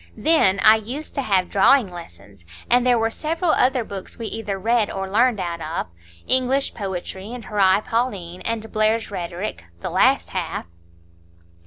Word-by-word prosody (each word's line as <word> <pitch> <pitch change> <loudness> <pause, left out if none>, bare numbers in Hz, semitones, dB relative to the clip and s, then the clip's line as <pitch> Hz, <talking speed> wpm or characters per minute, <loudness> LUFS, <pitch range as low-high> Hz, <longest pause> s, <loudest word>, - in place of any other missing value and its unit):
Then 250 -12 +3
I 220 0 +8
used 255 +8 -7
to 275 - -1
have 190 -7 +1
drawing 240 +6 +5
lessons; 100 - -12 0.3
and 245 +1 +4
there 245 -1 +4
were 225 0 0
several 325 +5 -1
other 255 -3 +2
books 200 -3 -8
we 230 - -6
either 215 -3 -4
read 225 +2 +1
or 195 0 -4
learned 230 +3 +2
out 170 -2 -4
of,—English 155 - -2
Poetry, 190 0 -5
and 245 -2 -8
Horæ 200 -1 +2
Paulinæ 195 -7 -2
and 225 -1 -3
Blair's 215 +1 +1
Rhetoric, 175 - -5 0.2
the - - -4
last - - +3
half." - - -3
215 Hz, 155 wpm, -22 LUFS, 185-240 Hz, 0.3 s, I